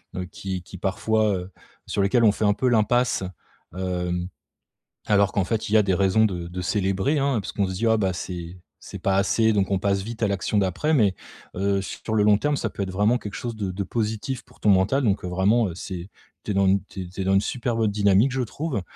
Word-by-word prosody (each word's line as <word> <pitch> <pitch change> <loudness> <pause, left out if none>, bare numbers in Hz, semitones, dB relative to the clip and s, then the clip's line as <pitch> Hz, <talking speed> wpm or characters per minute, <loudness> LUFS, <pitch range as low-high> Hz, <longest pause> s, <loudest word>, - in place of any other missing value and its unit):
heu, 90 - -3
qui 95 0 -6
qui, 95 - -11
parfois, 110 +4 +1
heu, 90 +1 -6 0.4
sur 100 - -1
lesquelles 115 +5 +3
on 105 - +6
fait 105 - -2
un 105 - +4
peu 125 +4 0
l'impasse, 120 -1 +2 0.5
heu, 90 -1 -2 0.9
alors 100 -1 +3
qu'en 100 - +1
fait, 110 +4 -2
il - - -5
y 110 - +6
a 105 - +6
des 95 -2 +1
raisons 100 +3 +3
de 90 -4 -4
de 90 +1 -6
célébrer, 95 - 0
hein. 135 -5 +1
Parce - - -6
qu'on 100 - 0
se - - -4
dit: 115 +6 -1
«Ah, 110 - +4
bah, 95 -4 0
c'est 90 0 -6 0.2
c'est - - -8
pas 95 0 +1
assez», 110 +3 +3
donc 100 -2 +1
on 95 - +2
passe 100 -1 +1
vite 115 +2 -7
à 110 - +3
l'action 100 +1 -1
d'après 100 - +1
mais, 105 -9 +3 0.4
heu, 100 0 +1
sur 110 +3 -5
le 105 - +3
long 105 0 +5
terme, 145 +4 0
ça 110 - -2
peut - - -5
être 95 - -6
vraiment 105 +6 +2
quelque 105 -3 -8
chose 120 -2 -5
de 100 -3 -3
de 100 +2 -3
positif 110 +5 -3
pour - - -23
ton 105 - +3
mental 100 +9 +3
donc, 100 -4 +1
heu, - - -2
vraiment, 100 +6 +2
heu, 85 - -6
c'est 90 0 -7 0.3
tu - - -3
es - - -4
dans 100 0 +3
une 95 +1 +3
tu 95 - -7
es 90 - -8
tu 95 - -8
es - - -1
dans 95 +1 +2
une 95 - +5
super 120 0 -2
bonne 110 -2 +2
dynamique, 100 +4 +3
je 130 - -1
trouve. 135 0 -3
100 Hz, 255 wpm, -24 LUFS, 95-110 Hz, 0.9 s, on